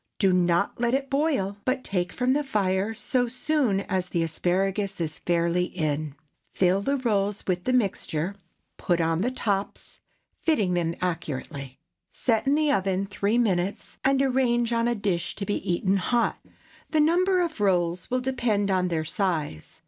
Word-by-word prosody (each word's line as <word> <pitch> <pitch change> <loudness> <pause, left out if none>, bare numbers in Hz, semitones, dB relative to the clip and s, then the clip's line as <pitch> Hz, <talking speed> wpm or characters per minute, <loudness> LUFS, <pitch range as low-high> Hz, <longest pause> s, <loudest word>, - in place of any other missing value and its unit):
Do 195 -3 +3
not 175 +3 +2
let 240 +1 +2
it 275 +1 -3
boil, 275 -10 0
but 255 0 -1
take 180 -2 -1
from 255 0 +1
the 295 +1 +1
fire 200 -5 0
so 245 +2 0
soon 250 -4 0
as 185 -2 -2
the 170 -2 0
asparagus 190 +4 -1
is 155 -2 -3
fairly 170 +1 +1
in; 155 -4 -2 0.3
fill 185 +1 +2
the 275 +6 0
rolls 205 -5 0
with 180 -1 -1
the 255 - +1
mixture, 195 -6 0 0.4
put 175 -1 0
on 165 +1 +1
the 240 - +1
tops, 205 -6 -3 0.4
fitting 210 - +2
them 170 -1 0
accurately; 140 -5 -4 0.3
set 230 +1 0
in 280 - +4
the 305 -1 +2
oven 195 -4 +1
three 200 +3 0
minutes, 195 -5 -1
and 270 0 +3
arrange 240 -3 +2
on 230 0 +2
a 240 - +1
dish, 190 -5 -2
to 200 - -4
be 205 - 0
eaten 190 +3 +1
hot. 235 +6 +1 0.5
The 315 - +1
number 360 +5 +3
of 330 -9 -2
rolls 180 -3 +1
will 255 0 0
depend 235 -6 0
upon 185 -1 +2
their 160 -3 -1
size. 160 - -2
195 Hz, 165 wpm, -26 LUFS, 175-245 Hz, 0.5 s, in